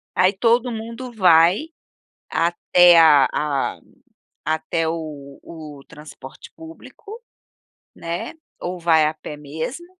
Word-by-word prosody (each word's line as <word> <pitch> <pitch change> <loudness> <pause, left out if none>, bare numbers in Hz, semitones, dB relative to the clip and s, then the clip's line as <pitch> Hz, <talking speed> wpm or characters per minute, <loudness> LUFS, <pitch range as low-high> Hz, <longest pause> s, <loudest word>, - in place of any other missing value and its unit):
Aí 185 +1 +3
todo 235 +4 +1
mundo 230 +2 -7
vai 180 - +3 0.6
até 175 +1 +4
a 150 -5 +6
a 145 -3 -2 0.6
até 160 +1 -2
o 150 -4 -7
o 155 -4 -11
transporte 150 -4 -13
público, 395 +7 -13 0.7
né. 170 +1 -6 0.3
Ou 180 +1 -5
vai 165 -2 +3
a 155 - -2
pé 155 -1 -10
mesmo, 160 - -7
165 Hz, 110 wpm, -20 LUFS, 155-220 Hz, 0.7 s, a